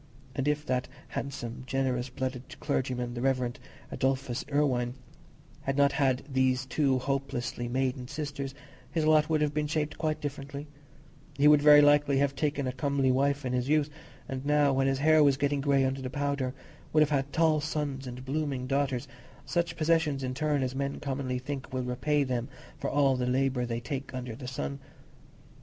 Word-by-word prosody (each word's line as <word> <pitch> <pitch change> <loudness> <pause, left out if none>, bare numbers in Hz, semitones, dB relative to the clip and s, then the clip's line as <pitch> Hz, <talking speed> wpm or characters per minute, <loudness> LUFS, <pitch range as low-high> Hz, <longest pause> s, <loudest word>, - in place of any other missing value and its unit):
And 135 +1 -2
if 150 0 0
that 125 -3 0 0.2
handsome, 130 -4 -5
generous 130 -1 0
blooded 130 0 -5
clergyman, 125 -2 -1
the 120 - -4
Rev. 130 -2 +1 0.4
Adolphus 130 -2 -1
Irwine, 130 -4 +1 0.7
had 135 0 -2
not 140 0 +5
had 135 -3 +1
these 130 -1 +1
two 135 0 +2
hopelessly 130 -2 -2
maiden 130 0 -1
sisters, 140 -1 -5 0.4
his 160 -2 0
lot 155 0 +4
would 155 -1 +2
have 150 -1 +1
been 150 0 0
shaped 150 0 -2
quite 155 -1 0
differently: 140 0 -5 0.7
he 145 +1 +5
would 150 -1 +7
very 150 0 +9
likely 145 -1 +4
have 140 0 +1
taken 140 -1 -1
a 130 - -1
comely 135 0 +1
wife 140 +2 +1
in 125 - -1
his 125 +1 0
youth, 150 -1 +2 0.4
and 130 0 -4
now, 145 -1 +3
when 135 0 +2
his 135 0 +1
hair 155 +2 +5
was 140 -2 +4
getting 145 0 0
grey 140 -1 +3
under 135 +1 -1
the 130 - -4
powder, 140 -1 -1 0.4
would 155 - +4
have 150 - -1
had 140 -1 0
tall 160 -2 +3
sons 145 -3 -3
and 125 +1 -7
blooming 140 -2 -2
daughters—such 140 +5 -2
possessions, 155 -3 +2
in 130 0 -2
short, 145 0 0
as 130 0 -2
men 140 +1 -2
commonly 135 -2 -2
think 135 +1 -5
will 130 -1 -2
repay 135 +4 +1
them 125 -1 -2 0.3
for - - -2
all 140 -2 +3
the 125 -1 -1
labour 130 -1 +1
they 115 0 -2
take 135 +2 -5
under 125 -3 -5
the 125 +1 -8
sun. 70 - -4
135 Hz, 180 wpm, -29 LUFS, 130-145 Hz, 0.7 s, very